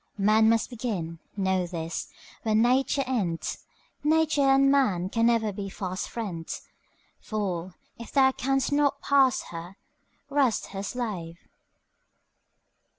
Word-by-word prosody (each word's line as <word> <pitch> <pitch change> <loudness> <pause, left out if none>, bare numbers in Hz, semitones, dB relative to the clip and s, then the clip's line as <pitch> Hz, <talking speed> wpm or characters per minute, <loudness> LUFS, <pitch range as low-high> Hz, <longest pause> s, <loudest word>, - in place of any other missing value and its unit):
Man 215 +2 +4
must 230 +2 +1
begin, 195 -9 -4 0.2
know 190 -2 +1
this, 165 -1 -4 0.3
where 220 -1 0
Nature 255 +4 +3
ends; 200 -11 -2 0.4
Nature 315 -1 +3
and 275 0 +5
man 200 -11 +2
can 230 +2 +2
never 225 -3 +2
be 195 0 -5
fast 185 0 -4
friends. 185 -8 -5 0.6
Fool, 185 -4 -3 0.2
if 235 - -9
thou 265 -1 +5
canst 270 +1 0
not 285 -1 +2
pass 270 -2 +4
her, 175 +3 -8 0.5
rest 275 -5 +1
her 195 0 -5
slave! 200 -7 -4
220 Hz, 120 wpm, -27 LUFS, 185-265 Hz, 0.6 s, and